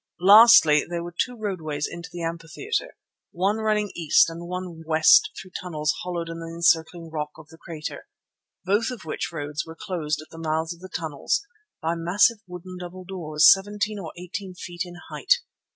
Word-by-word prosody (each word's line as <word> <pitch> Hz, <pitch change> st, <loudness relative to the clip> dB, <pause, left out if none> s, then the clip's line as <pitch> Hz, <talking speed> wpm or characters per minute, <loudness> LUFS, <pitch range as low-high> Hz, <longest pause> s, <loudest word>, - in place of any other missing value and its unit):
Lastly, 200 Hz, -5 st, +8 dB
there 170 Hz, -1 st, -4 dB
were 175 Hz, 0 st, -8 dB
two 250 Hz, +7 st, -1 dB
roadways 160 Hz, -9 st, -3 dB
into 170 Hz, -1 st, -8 dB
the 175 Hz, -1 st, -6 dB
amphitheatre, 170 Hz, -, -4 dB, 0.3 s
one 195 Hz, +5 st, 0 dB
running 215 Hz, -2 st, 0 dB
east 165 Hz, 0 st, +4 dB
and 170 Hz, +1 st, -8 dB
one 180 Hz, -2 st, -6 dB
west 160 Hz, 0 st, +5 dB
through 185 Hz, -, -11 dB
tunnels 150 Hz, -4 st, -1 dB
hollowed 175 Hz, -2 st, -4 dB
in 165 Hz, 0 st, -6 dB
the 165 Hz, -, -7 dB
encircling 165 Hz, 0 st, +1 dB
rock 150 Hz, -1 st, -3 dB
of 155 Hz, -1 st, -14 dB
the 160 Hz, -, -15 dB
crater, 160 Hz, -3 st, -7 dB, 0.6 s
both 205 Hz, +6 st, +2 dB
of 250 Hz, -9 st, -8 dB
which 155 Hz, -, -4 dB
roads 150 Hz, -2 st, -4 dB
were 160 Hz, 0 st, -11 dB
closed 160 Hz, -6 st, -2 dB
at 155 Hz, -, -11 dB
the 165 Hz, -, -10 dB
mouths 160 Hz, +1 st, -1 dB
of 170 Hz, -, -18 dB
the 185 Hz, +1 st, -10 dB
tunnels 160 Hz, -, -2 dB, 0.4 s
by 165 Hz, +1 st, +1 dB
massive 180 Hz, +7 st, +3 dB
wooden 180 Hz, +1 st, -9 dB
double 180 Hz, +1 st, -8 dB
doors, 165 Hz, -5 st, +2 dB
seventeen 205 Hz, +2 st, -3 dB
or 165 Hz, -5 st, -7 dB
eighteen 180 Hz, +1 st, -7 dB
feet 175 Hz, 0 st, -8 dB
in 175 Hz, -, -10 dB, 0.2 s
height. -, -, +3 dB
170 Hz, 180 wpm, -24 LUFS, 160-190 Hz, 0.6 s, Lastly